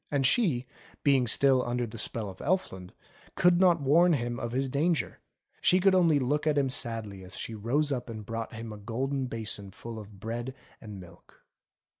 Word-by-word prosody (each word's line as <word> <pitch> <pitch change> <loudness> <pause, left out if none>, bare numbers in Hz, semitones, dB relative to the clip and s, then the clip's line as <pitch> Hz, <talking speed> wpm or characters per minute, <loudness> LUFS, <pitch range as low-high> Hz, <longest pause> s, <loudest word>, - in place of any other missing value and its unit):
And 140 -2 +1
she, 130 - +3 0.4
being 135 -4 +3
still 130 +2 +4
under 120 0 -1
the 115 0 -7
spell 110 0 -3
of 95 -1 -9
Elfland 95 - -1 0.5
could 175 0 +4
not 175 -4 +4
warn 165 +6 +5
him 120 -4 -2
of 120 - -4
his 135 +2 0
danger; 155 +5 0 0.4
she 185 - +5
could 195 +1 +4
only 170 -5 +4
look 145 +3 0
at 150 -1 +2
him 135 -2 +2
sadly 110 -6 -1
as 90 - -4
she 115 - -5
rose 130 +8 0
up 125 -3 -3
and 110 -2 -7
brought 115 +1 -4
him 110 0 -7
a - - -8
golden 130 +6 -2
basin 110 -4 -5
full 115 +3 -8
of 105 -2 -12
bread 120 +4 -5 0.3
and 105 -3 -9
milk. 85 -1 -16
125 Hz, 190 wpm, -29 LUFS, 110-145 Hz, 0.5 s, warn